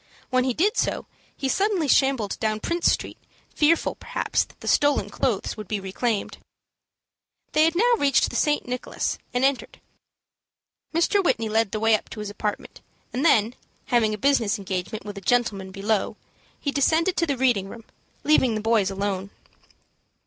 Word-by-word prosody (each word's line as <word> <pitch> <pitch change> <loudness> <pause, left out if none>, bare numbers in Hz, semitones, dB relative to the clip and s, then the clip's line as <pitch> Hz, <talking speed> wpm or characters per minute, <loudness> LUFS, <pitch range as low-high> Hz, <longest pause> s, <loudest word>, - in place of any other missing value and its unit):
When 255 0 +2
he 255 -2 0
did 410 +8 +1
so, - - 0 0.3
he 270 - -2
suddenly 390 +1 +1
shambled 265 -7 +2
down 215 -1 -1
Prince 340 +8 +1
Street, - - -3 0.3
fearful, 315 +2 +2
perhaps, - - -1
that - - -22
the - - -9
stolen 290 -1 +2
clothes 235 -7 -1
would 215 -3 -8
be 210 +1 -2
reclaimed. 200 +3 -2 1.1
They 310 +1 +4
had 325 +1 +1
now 480 +6 +4
reached 280 -2 +3
the - - -7
St. 295 -3 +1
Nicholas, 250 0 -3
and 250 +1 +1
entered. 270 -3 -1 1.1
Mr. 345 +5 +2
Whitney 225 -10 +1
led 220 -1 +1
the 215 - -2
way 225 +1 +3
up 215 - 0
to - - -8
his 210 -1 -5
apartment, 210 0 -5 0.3
and 255 - -1
then, 230 -8 +4 0.4
having 230 -3 +3
a 210 - -3
business 240 -3 +2
engagement 190 +2 -4
with 205 -1 -6
a - - -18
gentleman 200 -4 0
below, 200 +2 -1 0.4
he 285 - -2
descended 320 +6 +2
to 335 - +1
the 280 -3 -1
reading 240 -7 +1
room, 230 +1 -10 0.4
leaving 260 -6 +3
the - - -1
boys 215 -3 +2
alone. 195 0 -3
235 Hz, 170 wpm, -24 LUFS, 210-285 Hz, 1.1 s, They